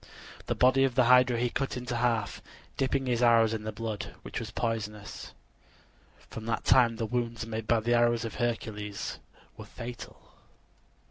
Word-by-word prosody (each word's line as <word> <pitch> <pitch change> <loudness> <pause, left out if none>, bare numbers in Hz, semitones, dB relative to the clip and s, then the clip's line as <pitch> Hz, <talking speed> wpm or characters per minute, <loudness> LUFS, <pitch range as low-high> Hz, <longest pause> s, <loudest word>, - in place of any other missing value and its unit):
The - - 0
body 130 +1 +4
of 130 -2 +1
the 130 - +5
hydra 125 0 +5
he 120 0 0
cut 135 -2 -2
into 125 -1 -4
half, 115 -4 0 0.3
dipping 135 0 0
his 120 -2 0
arrows 115 -2 +5
in 110 -1 -4
the 110 - -2
blood, 110 -1 -5
which - - -5
was 115 - -6
poisonous. 105 -2 -4 1.0
From 110 0 -8
that 115 - -1
time 120 -3 +5
the 115 - -2
wounds 115 -1 -2
made 110 -1 -5
by 115 -1 +3
the 120 +2 +1
arrows 120 0 +3
of 115 - -5
Hercules 105 -4 -3 0.4
were - - -9
fatal. 120 0 -10
115 Hz, 165 wpm, -29 LUFS, 110-125 Hz, 1.0 s, the